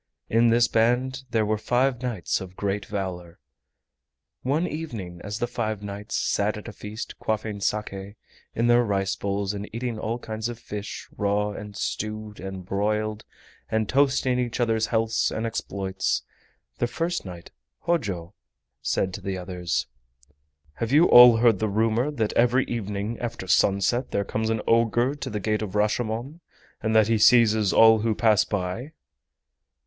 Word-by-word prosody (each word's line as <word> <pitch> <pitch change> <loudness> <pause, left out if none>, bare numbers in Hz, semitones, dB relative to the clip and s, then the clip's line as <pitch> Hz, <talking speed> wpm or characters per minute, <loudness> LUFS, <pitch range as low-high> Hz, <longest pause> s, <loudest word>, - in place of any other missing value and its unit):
In 115 +1 +4
this 120 +1 +4
band 125 +4 +1
there 110 -2 +1
were 105 0 0
five 125 +2 +1
knights 120 -9 -2
of 95 -1 -9
great 100 0 -2
valor. 90 -4 -5 1.0
One 145 +7 0
evening 110 - -6
as 105 0 -4
the 120 - 0
five 110 -3 -3
knights 100 +1 -6
sat 105 +1 0
at 105 - -9
a 115 - -7
feast 105 +3 -7
quaffing 110 -1 -2
SAKE 100 -1 -3 0.4
in 115 - +1
their 120 0 +5
rice 100 -3 0
bowls 100 0 -2
and 100 0 -6
eating 115 -1 -4
all 115 +2 -2
kinds 110 -1 -4
of 120 - -6
fish, 105 -2 -7
raw, 105 +1 0
and 105 0 -8
stewed, 110 0 -4
and 95 -1 -7
broiled, 105 +2 -1 0.4
and 110 -1 0
toasting 130 -1 +2
each 120 -1 -2
other's 110 -2 +1
healths 115 -1 +1
and 110 - -3
exploits, 95 -4 -2 0.6
the - - +1
first 170 +6 -2
knight, 90 -3 -10 0.3
Hojo, 100 - -2 0.5
said 95 -1 0
to - - -6
the 95 -1 -3
others: 90 -1 -2 0.9
"Have 115 0 -2
you 155 +5 +6
all 120 -1 +9
heard 115 -4 +4
the 110 - 0
rumor 110 +5 +1
that 115 -8 -1
every 125 +3 +3
evening 105 0 -4
after 115 -5 -5
sunset 100 +6 +2
there 100 - -1
comes 110 +2 -2
an 110 -1 -1
ogre 115 +3 +2
to 145 -2 -6
the 105 -3 -3
Gate 105 +2 -1
of 105 -2 -5
Rashomon, 115 +7 -1 0.4
and 110 -1 0
that 110 -1 +5
he 115 -1 +2
seizes 110 -3 +5
all 110 0 +7
who 110 0 0
pass 110 -1 +4
by?" 100 - -4
110 Hz, 160 wpm, -25 LUFS, 100-120 Hz, 1.0 s, all